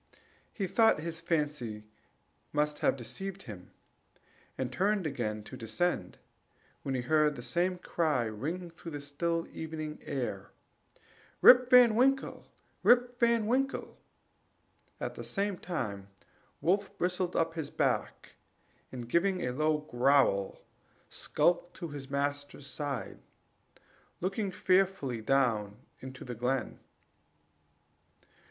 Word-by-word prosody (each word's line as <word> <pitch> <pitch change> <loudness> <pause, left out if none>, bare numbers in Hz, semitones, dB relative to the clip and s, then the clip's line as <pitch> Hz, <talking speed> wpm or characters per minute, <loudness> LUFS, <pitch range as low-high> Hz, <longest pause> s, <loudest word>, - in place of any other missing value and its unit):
He 200 - -2
thought 195 -2 +4
his 165 0 -5
fancy 145 -10 -2 0.7
must 150 0 0
have - - +2
deceived 190 +10 -6
him, 95 -5 -10 0.9
and 130 -1 -3
turned 200 +2 +1
again 110 -7 -2
to - - -10
descend, 115 - -2 0.6
when 135 - -2
he 125 - 0
heard 150 +3 +3
the 120 - -7
same 175 +9 0
cry 155 -7 0
ring 155 +12 -4
through 165 -1 -9
the 145 - -4
still 165 +4 -2
evening 155 -1 -5
air: 120 -9 -4 0.9
"Rip 250 0 +8
Van 250 -3 +8
Winkle! 270 +4 +1 0.3
Rip 245 0 +4
Van 235 -2 +3
Winkle!" 265 +4 -1 1.0
at - - -3
the - - -7
same 200 -1 -1
time 105 - -4 0.5
Wolf 195 +4 +1
bristled 180 0 -1
up 165 0 +1
his 160 -3 -4
back, - - -1 0.6
and 125 -2 -6
giving 180 +6 +1
a 125 - -1
low 155 +4 +1
growl, 125 -7 +2 0.5
skulked 175 0 0
to 170 -3 -6
his 140 -2 -8
master's 145 0 -2
side, 140 -2 -4 1.0
looking 195 +3 -1
fearfully 185 -11 +1
down 110 -5 +1 0.3
into 130 0 -9
the 125 - -5
glen. 125 +2 -2
155 Hz, 120 wpm, -31 LUFS, 130-185 Hz, 1.0 s, Rip